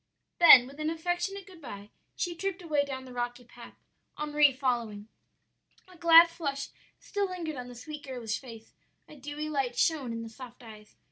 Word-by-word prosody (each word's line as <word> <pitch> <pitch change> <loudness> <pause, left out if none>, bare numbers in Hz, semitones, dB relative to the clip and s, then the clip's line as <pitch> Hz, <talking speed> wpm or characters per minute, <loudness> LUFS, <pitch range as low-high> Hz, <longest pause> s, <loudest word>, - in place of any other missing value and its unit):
"Then 300 -8 +10
with 275 +3 -13
an 305 0 -1
affectionate 350 +4 -3
good 365 -4 -15
by, 205 -6 -9 0.2
she 355 - -2
tripped 385 +1 -4
away 300 -4 +1
down 265 -2 -6
the 255 - -11
rocky 245 0 -4
path, 240 0 -14 0.4
Henri 300 -1 +3
following. 235 -6 -2 0.8
"A 365 - -17
glad 335 0 +8
flush 285 -5 -4 0.3
still 405 -2 -2
lingered 335 -4 -5
on 250 -1 -7
the 245 - -11
sweet, 295 +5 -8
girlish 240 -5 -4
face, 230 -4 -12 0.3
a - - -13
dewy 290 +2 -6
light 270 -5 -2
shone 290 -7 +1
in 230 0 -5
the 225 - -8
soft 245 +1 -12
eyes. 215 -2 -14
280 Hz, 180 wpm, -29 LUFS, 245-330 Hz, 0.8 s, Then